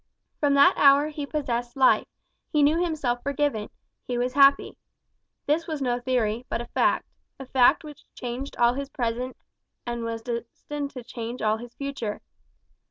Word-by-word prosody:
From 285 -1 +2
that 320 +7 +7
hour 285 +1 +6
he 295 -2 -5
possessed 245 -4 -3
life, 260 -1 +4 0.4
he 300 -2 +3
knew 315 +4 +3
himself 280 -8 -1
forgiven, 280 -6 -1 0.4
he 245 - -2
was 250 +1 -1
happy. 280 0 +5 0.7
This 315 +3 0
was 310 -3 -3
no 245 -3 0
theory, 240 -2 0
but - - -1
a 240 - -5
fact - - +1 0.3
a 270 - -7
fact 260 +4 +4
which 300 -2 -12
changed 250 +3 -6
all 240 0 +4
his 275 +1 -5
present 250 -1 -3 0.5
and 240 -1 -3
was 230 0 -4
destined 250 +5 -5
to 255 -3 -9
change 235 0 -6
all 215 0 +2
his 240 +1 -11
future. 275 -7 -4
255 Hz, 165 wpm, -26 LUFS, 240-285 Hz, 0.7 s, that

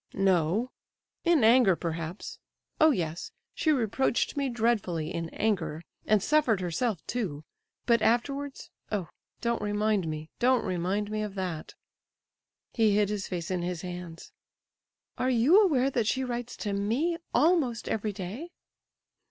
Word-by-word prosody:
"No—in 195 - 0
anger, 230 -4 +6
perhaps. 165 +2 -5 0.4
Oh 315 - +7
yes! 170 - -2 0.2
she 315 - +1
reproached 255 0 +1
me 280 -2 0
dreadfully 210 -9 0
in 165 -1 -3
anger; 170 -8 -1 0.2
and 215 -2 +3
suffered 285 -9 +3
herself, 185 +2 -2
too! 175 -12 -3 0.4
But 235 -2 +3
afterwards—oh! 240 - -2 0.3
don't 235 -1 0
remind 210 -3 0
me—don't 160 +12 0
remind 190 +3 -1
me 215 0 -1
of 210 -2 -4
that!" 180 -5 -4 1.0
He 220 -3 +3
hid 205 -1 +3
his 210 -2 -3
face 175 -2 -4
in 180 -1 -1
his 175 -1 -3
hands. 175 -2 -8 0.9
"Are 255 - +1
you 260 - +5
aware 275 -8 +2
that 235 -4 0
she 265 +3 +1
writes 245 -1 -4
to 205 -2 -3
me 240 +13 0
almost 295 -8 +2
every 215 -1 -1
day?" 200 - -6
210 Hz, 130 wpm, -28 LUFS, 180-245 Hz, 1.0 s, Oh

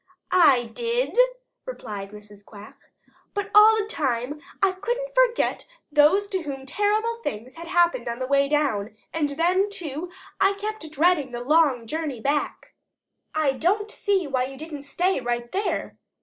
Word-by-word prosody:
"I 295 -9 +5
did," 475 +1 -1 0.5
replied 205 - -7
Mrs. 210 0 -14
Quack, 205 +1 -13 0.6
"but 405 0 -3
all 430 +1 +8
the 425 - 0
time 280 - -2 0.2
I 390 -1 +3
couldn't 485 +6 -3
forget - - +2 0.2
those 300 +7 +4
to 380 -2 -2
whom 275 -4 -6
terrible 420 - 0
things 230 - -5
had 335 0 -10
happened 345 -9 +2
on 235 - -3
the 255 - -3
way 275 +1 +2
down, 225 -9 0 0.2
and 305 -3 0
then, 355 +7 +1
too, 350 -4 -5 0.3
I 390 +1 +4
kept 415 -4 -5
dreading 310 -4 +2
the 240 - -4
long 280 -3 +3
journey 300 -1 -4
back." 285 +5 -2 0.6
"I 310 -3 +2
don't 400 +10 0
see 395 -4 0
why 260 -3 0
you 270 +1 -9
didn't 310 -1 -7
stay 355 +5 0
right 240 -1 -3
there. 400 +2 -2
310 Hz, 155 wpm, -24 LUFS, 260-400 Hz, 0.6 s, all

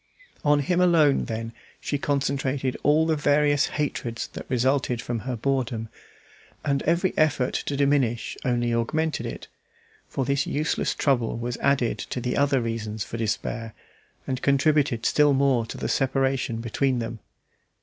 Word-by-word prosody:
On 145 -1 +4
him 175 +6 +1
alone, 160 -6 +4
then, 115 0 -4 0.3
she 145 - -2
concentrated 135 -2 -1
all 150 +3 +4
the 160 -1 +2
various 145 -1 +3
hatreds 120 -6 -3
that - - -9
resulted 130 -1 +1
from 120 -1 -3
her 125 +3 -4
boredom, 120 -2 -1 0.8
and 140 -1 +1
every 170 +3 +2
effort 145 -5 +2
to 140 - -2
diminish 135 -5 +1
only 120 -2 0
augmented 155 +7 -1
it; - - -7 0.6
for 135 - -2
this 140 +1 0
useless 155 +2 -1
trouble 120 -6 +1
was 120 +1 -3
added 140 -4 +1
to - - -4
the 125 0 -2
other 140 -2 +2
reasons 110 -2 -3
for 115 - -6
despair, 115 0 -3 0.5
and 130 -1 -3
contributed 140 -4 +2
still 150 -1 +4
more 135 -4 +2
to - - -7
the - - -3
separation 135 -3 0
between 130 +3 0
them. 115 -1 -4
135 Hz, 150 wpm, -25 LUFS, 115-145 Hz, 0.8 s, On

